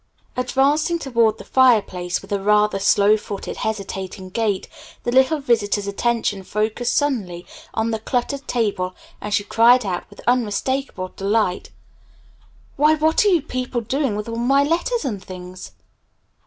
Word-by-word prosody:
Advancing 280 +6 +1
toward 230 -7 +1
the - - -10
fireplace 205 -9 +2
with 195 - -14
a 200 -1 0
rather 210 0 +3
slow 200 +1 +4
footed, 205 -2 -6
hesitating 195 -3 -4
gait, 210 -2 -1 0.4
the 240 - -1
little 265 +5 +4
visitor's 215 -6 +1
attention 205 0 -1
focused 215 +5 -1
suddenly 200 -12 -1 0.3
on 225 +1 0
the 220 - -2
cluttered 270 +5 -2
table 200 -6 -1 0.3
and 210 - -5
she 205 0 +1
cried 235 +3 +4
out 180 -2 -3
with - - -16
unmistakable 245 -3 -1
delight. 195 -1 -1 1.1
"Why, 300 +2 +5
what 315 +4 +2
are - - +5
you 350 -7 +3
people 255 -4 -3
doing 265 0 -1
with 210 +1 -4
all 230 0 -4
my 270 +4 +3
letters 340 +8 0
and 205 -8 -3
things?" 180 0 -9
225 Hz, 145 wpm, -21 LUFS, 200-260 Hz, 1.1 s, Why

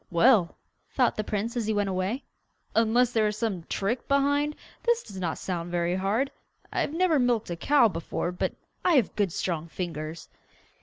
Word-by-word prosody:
'Well,' 180 0 +4 0.3
thought 250 -3 +2
the 215 - -1
prince 215 +3 -2
as 230 -3 -1
he 220 - +1
went 205 -1 +1
away, 190 +8 -1 0.5
'unless 230 +2 +3
there 220 -2 +2
is 210 0 -2
some 200 -7 -2
trick 225 +5 -1
behind, 285 +1 +2 0.3
this 475 0 +2
does 195 -2 -9
not 170 -3 -2
sound 175 -2 -3
very 175 0 0
hard. 205 +9 0 0.4
I - - +1
have - - -1
never 340 -4 +3
milked 240 -6 +1
a - - -1
cow 275 +7 +4
before, 170 -1 -3
but 180 - -2 0.3
I 355 - +4
have 255 - +2
good 200 -4 +1
strong 165 -1 -2
fingers. 165 -2 -5
215 Hz, 185 wpm, -27 LUFS, 180-250 Hz, 0.5 s, Well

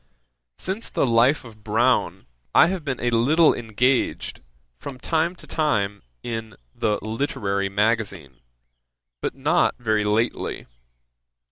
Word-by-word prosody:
] - - -57
'Since 195 +5 -4
the - - +1
Life 125 +4 +3
of 110 -2 -14
Browne, 120 +4 +1 0.3
I - - +8
have 185 -3 -3
been 135 -4 -3
a 120 - 0
little 150 +8 +4
engaged, 120 - 0 0.4
from 135 -2 -7
time 165 +4 0
to - - -15
time, 105 -11 0 0.2
in 110 -3 -5 0.2
the 105 -3 0
Literary 110 -4 -1
Magazine, 100 - -1 0.8
but - - -3
not - - +2
very 110 -3 +1
lately. 105 +3 -1
115 Hz, 125 wpm, -23 LUFS, 105-135 Hz, 0.8 s, I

